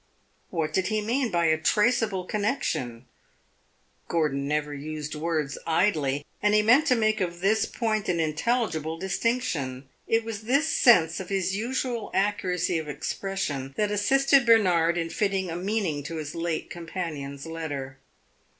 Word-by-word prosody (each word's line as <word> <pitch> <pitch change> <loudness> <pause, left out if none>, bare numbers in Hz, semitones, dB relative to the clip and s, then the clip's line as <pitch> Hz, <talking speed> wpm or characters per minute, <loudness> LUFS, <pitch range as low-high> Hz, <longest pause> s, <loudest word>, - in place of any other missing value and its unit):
What 155 -2 -2
did 190 +1 +1
he 215 0 0
mean 240 +4 0
by 170 -3 +1
a 160 -1 +3
"traceable" 210 0 +2
connection? 185 - -2 1.0
Gordon 145 -4 0
never 150 0 -1
used 150 +1 -5
words 155 -2 -2
idly, 155 -5 +1 0.2
and 210 0 +3
he 210 - +4
meant 250 +8 +5
to 255 - +4
make 215 -2 +1
of 175 -1 -2
this 205 +3 +2
point 215 -3 -1
an 175 -2 +1
intelligible 160 -1 -1
distinction. 180 - -2 0.2
It 225 0 +2
was 220 -2 -5
this 280 +7 +2
sense 175 - +4
of 185 - -7
his 195 -1 0
usual 240 +1 -2
accuracy 180 -4 0
of 155 - -7
expression 145 -3 -3
that 210 -1 +1
assisted 270 +6 +4
Bernard 180 -8 +4
in 165 -1 -2
fitting 195 -5 -1
a - - -4
meaning 185 -5 -1
to 165 - -5
his 150 -2 -5
late 165 -1 -3
companion's 160 -5 -5
letter. 145 -5 -5
180 Hz, 150 wpm, -26 LUFS, 155-215 Hz, 1.0 s, meant